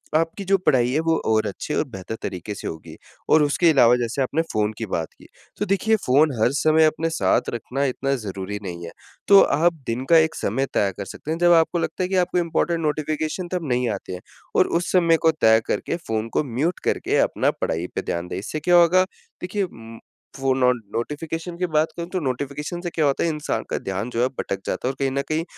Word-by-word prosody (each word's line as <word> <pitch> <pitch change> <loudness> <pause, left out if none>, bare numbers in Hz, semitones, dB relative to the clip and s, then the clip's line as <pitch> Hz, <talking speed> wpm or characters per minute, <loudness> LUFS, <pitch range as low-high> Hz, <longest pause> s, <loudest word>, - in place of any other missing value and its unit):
आपकी 165 +5 0
जो 195 +1 +3
पढ़ाई 125 -3 +3
है 150 - +1
वो 165 - +3
और 110 -1 +2
अच्छी 105 +9 -5
और - - +1
बेहतर 95 0 -6
तरीके 95 +1 -5
से - - -6
होगी। 80 -1 -8 0.3
और 155 -1 +6
उसके 165 +4 +3
अलावा 125 -5 +6
जैसे 120 +3 -2
आपने 140 +5 +1
फ़ोन 105 0 0
की 115 - -3
बात 80 -5 -2
की। - - -17 0.3
तो 205 - -1
देखिए 210 +3 +2
फ़ोन 145 +4 +4
हर 120 - +4
समय 155 0 +4
अपने 160 +1 0
साथ 165 - +1
रखना 125 +4 -3
इतना 135 +1 -1
ज़रूरी 100 -3 -5
नहीं 85 -2 -6
है। - - -8 0.4
तो 200 -1 +8
आप 170 +4 +3
दिन 120 +3 -2
का 165 - +7
एक 160 0 +3
समय 130 +7 -1
तक - - -17
तय 100 -1 +2
कर 100 - -5
सकते 155 - -7
हैं 165 - -1
जब 175 0 +4
आपको 165 +1 +3
लगता 185 - -2
है 180 - -2
कि 195 - -1
आपको 180 0 +1
इम्पोर्टेंट 170 0 0
नोटिफ़िकेशन 155 +3 -2
तब 175 -5 -2
नहीं 125 0 +1
आते 95 - -7
हैं। 90 - -7 0.3
और - - +4
उस 175 - -4
समय 170 -3 +4
को 160 - +6
तय 110 0 +6
करके - - -1
फ़ोन 110 0 -2
को - - +2
म्यूट 165 +7 0
करके - - 0
अपना - - +2
पढ़ाई 85 +2 -1
पे - - -1
ध्यान 85 +1 -3
दें। 90 - -5
इससे 155 +10 -4
क्या 175 +4 +3
होगा? 175 +2 +6 0.4
देखिए 195 +3 -2
उम, 115 -10 -9 0.4
वो 135 0 +2
नो 125 -1 +3
नोटिफ़िकेशन 150 - -5
की 180 - 0
बात 155 +1 +3
करूँ 170 0 -4
तो 185 - -1
नोटिफ़िकेशन 145 +5 -4
से 175 - -3
क्या 160 -3 0
होता 140 - +1
है 170 - +1
इंसान 150 -2 -2
का - - -1
ध्यान 95 +5 -4
जो 120 0 -2
है 125 - +3
भटक 100 - -2
जाता - - -2
है। - - +2
और 135 - -12
कहीं 135 -1 0
न 140 +1 0
कहीं 155 +1 0
145 Hz, 235 wpm, -23 LUFS, 115-165 Hz, 0.4 s, तो